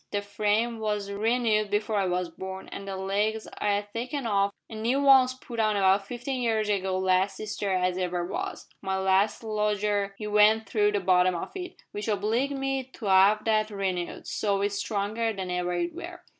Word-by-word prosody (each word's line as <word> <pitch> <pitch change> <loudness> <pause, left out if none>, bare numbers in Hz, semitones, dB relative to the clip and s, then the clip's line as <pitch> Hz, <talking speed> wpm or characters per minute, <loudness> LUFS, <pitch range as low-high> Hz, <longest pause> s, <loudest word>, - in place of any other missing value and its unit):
The 205 0 -2
frame 210 +3 0
was 210 -2 -2
renoo'd 215 0 +1
before 210 +1 0
I 195 -2 +1
was 180 0 0
born, 190 +3 -8
an' 200 - -7
the 195 -1 -4
legs 205 +3 -1
I - - -1
'ad 205 0 0
taken 250 +4 -3
off 200 -2 +2 0.2
an' 220 -1 -7
noo 245 +5 +1
ones 260 -2 +6
putt 240 -2 -8
on 215 -1 +2
about 195 0 +3
fifteen 250 +2 -4
year 230 -2 +1
ago 195 -3 0
last 190 +1 +1
Easter 210 -2 -3
as 185 0 +1
ever 180 -1 -1
was. 180 - -5
My 190 -1 -1
last 190 +4 +2
lodger 210 -2 0
'ee 215 - -5
went 210 +1 +4
through 210 -1 +2
the 205 - +2
bottom 185 -1 +3
of 170 - -5
it, 360 -2 -8
w'ich 205 +1 -4
obliged 225 +7 0
me 270 -1 -1
to 210 -5 -4
'ave 195 +3 +5
that 215 -1 +2
renoo'd, 190 -4 -3
so 200 -2 -1
it's 205 0 0
stronger 215 +2 -1
than 190 -3 -4
ever 180 0 -1
it 345 - -1
were. 350 +1 -8
210 Hz, 195 wpm, -27 LUFS, 195-225 Hz, 0.2 s, ones